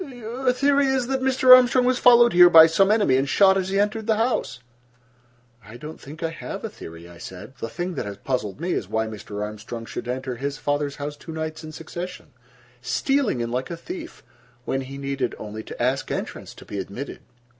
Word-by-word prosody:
"Your 250 Hz, -2 st, -2 dB
theory 280 Hz, +2 st, +2 dB
is 265 Hz, -2 st, +1 dB
that 265 Hz, +1 st, -2 dB
Mr. 260 Hz, -1 st, +7 dB
Armstrong 250 Hz, 0 st, +4 dB
was 255 Hz, 0 st, +2 dB
followed 240 Hz, -1 st, +6 dB
here 175 Hz, 0 st, +8 dB
by 160 Hz, -2 st, +10 dB
some 195 Hz, +5 st, +3 dB
enemy, 205 Hz, -12 st, +3 dB
and 135 Hz, +1 st, 0 dB
shot 195 Hz, +3 st, +5 dB
as 190 Hz, -1 st, -1 dB
he 195 Hz, +1 st, 0 dB
entered 210 Hz, +2 st, -1 dB
the 220 Hz, -, +3 dB
house?" 225 Hz, -, -1 dB, 1.0 s
"I 110 Hz, +4 st, -12 dB
don't 155 Hz, +4 st, -10 dB
think 155 Hz, +4 st, -10 dB
I 165 Hz, -, -1 dB
have 195 Hz, +4 st, -7 dB
a -, -, -4 dB
theory," 85 Hz, -, -11 dB
I 85 Hz, -1 st, -14 dB
said. 95 Hz, +8 st, -10 dB
"The 115 Hz, -, -4 dB
thing 175 Hz, +8 st, -4 dB
that 105 Hz, -, -4 dB
has 100 Hz, -1 st, -7 dB
puzzled 125 Hz, -2 st, -3 dB
me 175 Hz, +3 st, -2 dB
is -, -, -3 dB
why 110 Hz, 0 st, 0 dB
Mr. 105 Hz, -1 st, -6 dB
Armstrong 110 Hz, +2 st, -7 dB
should 120 Hz, -, -7 dB
enter 130 Hz, 0 st, -4 dB
his 140 Hz, +3 st, -4 dB
father's 145 Hz, -1 st, -2 dB
house 145 Hz, +1 st, -5 dB
two 160 Hz, -, -11 dB
nights 160 Hz, 0 st, -5 dB
in 155 Hz, -, -8 dB
succession, 175 Hz, +3 st, -8 dB, 0.5 s
stealing 265 Hz, -, 0 dB
in 115 Hz, 0 st, -3 dB
like 125 Hz, +2 st, -2 dB
a 170 Hz, -, -5 dB
thief, 340 Hz, -, -9 dB, 0.4 s
when 135 Hz, -, -1 dB
he 135 Hz, +1 st, -8 dB
needed 140 Hz, -2 st, -3 dB
only 110 Hz, +1 st, -7 dB
to -, -, -10 dB
ask 130 Hz, +3 st, 0 dB
entrance -, -, -5 dB
to -, -, -13 dB
be 100 Hz, -, -5 dB
admitted." 100 Hz, +9 st, -6 dB
160 Hz, 210 wpm, -23 LUFS, -, 1.0 s, by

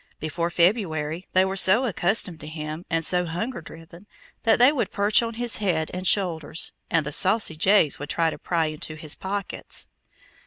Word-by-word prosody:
Before 170 Hz, +2 st, -2 dB
February 170 Hz, -3 st, 0 dB
they 185 Hz, +1 st, +5 dB
were 190 Hz, 0 st, -2 dB
so 195 Hz, +6 st, +4 dB
accustomed 190 Hz, -4 st, 0 dB
to 150 Hz, -, -8 dB
him, 155 Hz, +1 st, -6 dB
and 165 Hz, -1 st, 0 dB
so 180 Hz, +1 st, +3 dB
hunger 180 Hz, +6 st, -3 dB
driven, 165 Hz, +4 st, -13 dB, 0.3 s
that 225 Hz, -, +4 dB
they 250 Hz, +3 st, +7 dB
would 285 Hz, -5 st, -1 dB
perch 205 Hz, +2 st, +2 dB
on 230 Hz, -1 st, -4 dB
his 240 Hz, 0 st, -2 dB
head 175 Hz, -7 st, 0 dB
and 185 Hz, 0 st, -3 dB
shoulders, 165 Hz, -6 st, 0 dB, 0.2 s
and 165 Hz, -3 st, +2 dB
the 150 Hz, -, -4 dB
saucy 190 Hz, +1 st, +2 dB
jays 185 Hz, -2 st, +3 dB
would 145 Hz, 0 st, -6 dB
try 165 Hz, -1 st, +1 dB
to -, -, -8 dB
pry 165 Hz, -2 st, 0 dB
into 155 Hz, 0 st, -5 dB
his 155 Hz, -1 st, -6 dB
pockets. 200 Hz, 0 st, -5 dB
175 Hz, 185 wpm, -25 LUFS, 160-200 Hz, 0.3 s, they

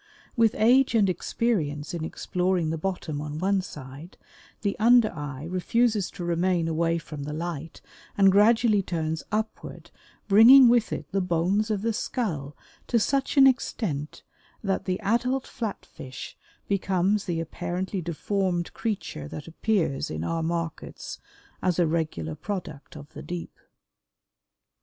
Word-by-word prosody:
With 230 Hz, -3 st, +3 dB
age 250 Hz, +3 st, +4 dB
and 210 Hz, -3 st, +4 dB
experience 160 Hz, -9 st, -2 dB
in 170 Hz, -2 st, -3 dB
exploring 180 Hz, 0 st, -1 dB
the 165 Hz, -, -2 dB
bottom 160 Hz, -5 st, -3 dB
on 150 Hz, 0 st, -5 dB
one 190 Hz, +3 st, +1 dB
side, 150 Hz, 0 st, -10 dB, 0.4 s
the 200 Hz, -2 st, -1 dB
under 235 Hz, 0 st, +5 dB
eye 145 Hz, -3 st, -6 dB
refuses 205 Hz, +4 st, +1 dB
to 175 Hz, -, -8 dB
remain 175 Hz, 0 st, +1 dB
away 165 Hz, +1 st, +1 dB
from 155 Hz, -3 st, -7 dB
the 145 Hz, +1 st, -5 dB
light 165 Hz, -1 st, -5 dB, 0.4 s
and 195 Hz, -1 st, +6 dB
gradually 215 Hz, +1 st, +4 dB
turns 160 Hz, -3 st, -2 dB
upward, 220 Hz, +1 st, -4 dB, 0.4 s
bringing 235 Hz, +6 st, +9 dB
with 240 Hz, -2 st, +3 dB
it -, -, -5 dB
the 195 Hz, 0 st, +1 dB
bones 180 Hz, +5 st, +1 dB
of 210 Hz, -2 st, -1 dB
the 230 Hz, 0 st, +1 dB
skull 155 Hz, -, -3 dB, 0.3 s
to 240 Hz, -, +2 dB
such 270 Hz, +6 st, 0 dB
an 270 Hz, -, +9 dB
extent 195 Hz, -, 0 dB, 0.4 s
that 195 Hz, -2 st, -1 dB
the 185 Hz, -1 st, -1 dB
adult 250 Hz, +5 st, 0 dB
Flat 225 Hz, -5 st, -5 dB
fish 130 Hz, 0 st, -9 dB, 0.3 s
becomes 195 Hz, +1 st, +1 dB
the 170 Hz, -3 st, -2 dB
apparently 175 Hz, +3 st, -3 dB
deformed 175 Hz, +1 st, -2 dB
creature 200 Hz, -, -4 dB
that 150 Hz, -, -8 dB
appears 165 Hz, -4 st, -1 dB
in 80 Hz, +1 st, -4 dB
our 165 Hz, -, -1 dB
markets 165 Hz, 0 st, -4 dB, 0.4 s
as 180 Hz, -2 st, +1 dB
a 175 Hz, -, +4 dB
regular 155 Hz, -, -2 dB
product 160 Hz, -, -6 dB
of 145 Hz, 0 st, -12 dB
the -, -, -8 dB
deep. 175 Hz, -1 st, -7 dB
180 Hz, 145 wpm, -26 LUFS, 160-215 Hz, 0.4 s, bringing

